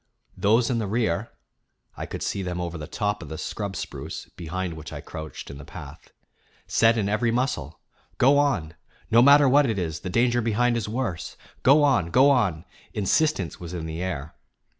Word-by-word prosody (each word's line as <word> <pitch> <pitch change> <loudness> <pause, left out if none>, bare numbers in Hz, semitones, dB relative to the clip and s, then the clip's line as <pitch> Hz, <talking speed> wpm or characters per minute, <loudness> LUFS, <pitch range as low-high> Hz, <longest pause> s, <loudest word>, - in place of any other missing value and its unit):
Those 115 +4 +3
in 120 - 0
the 110 - -2
rear 105 -1 0 0.7
(I - - -6
could - - -5
see 100 - -2
them 90 -1 -3
over 85 -1 -4
the 75 -2 -6
top 105 -1 -2
of 80 - -9
the 80 - -6
scrub 100 +2 -4
spruce, - - -6
behind 90 +1 -4
which 80 -1 -9
I - - -6
crouched 80 -2 -8
in 70 - -9
the - - -9
path) - - -11 0.6
said 115 0 +3
in 105 -3 0
every 110 +3 +1
muscle: 115 - -2 0.4
"Go 140 +3 +5
on! 115 - 0 0.4
No 115 +1 +7
matter 140 +2 +7
what 140 0 +4
it 110 - -1
is, 80 -4 -2
the 95 - -6
danger 120 +4 +2
behind 120 +2 +1
is 115 -3 -2
worse. 110 -8 -3 0.2
Go 145 +3 +6
on, 125 - +3
go 135 +8 +5
on!" 95 - +1 0.3
Insistence 105 - +1
was 85 0 -7
in 80 -2 -4
the 80 +1 -5
air. 80 -5 -4
105 Hz, 190 wpm, -25 LUFS, 85-120 Hz, 0.7 s, No